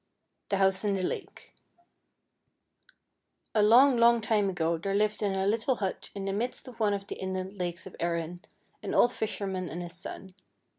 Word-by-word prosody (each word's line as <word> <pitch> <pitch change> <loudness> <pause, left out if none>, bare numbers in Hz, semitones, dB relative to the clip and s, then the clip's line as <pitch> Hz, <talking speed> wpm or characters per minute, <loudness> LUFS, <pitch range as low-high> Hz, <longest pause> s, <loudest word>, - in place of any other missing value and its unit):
THE 200 - +1
HOUSE 190 0 +2
IN 205 -1 +1
THE 190 - -2
LAKE - - -5 2.0
2 220 - +2
ALONG, 245 +5 +6
long 235 0 +6
time 215 -2 +1
ago 170 -2 0
there 195 +3 -2
lived 210 +1 +1
in 200 -2 +1
a 190 0 0
little 225 +5 +1
hut, 195 -4 -4
in 195 -1 -4
the 195 - -1
midst 240 +6 -3
of 240 -2 -11
one 210 -2 +2
of 200 0 -6
the - - -7
inland 190 +1 -4
lakes 175 -1 -3
of 190 - -10
Erin, 170 0 -2 0.4
an - - -3
old 240 - +5
fisherman 190 -4 -3
and 175 +2 -5
his 175 0 -8
son. 185 +1 -8
195 Hz, 185 wpm, -29 LUFS, 185-215 Hz, 2.0 s, ALONG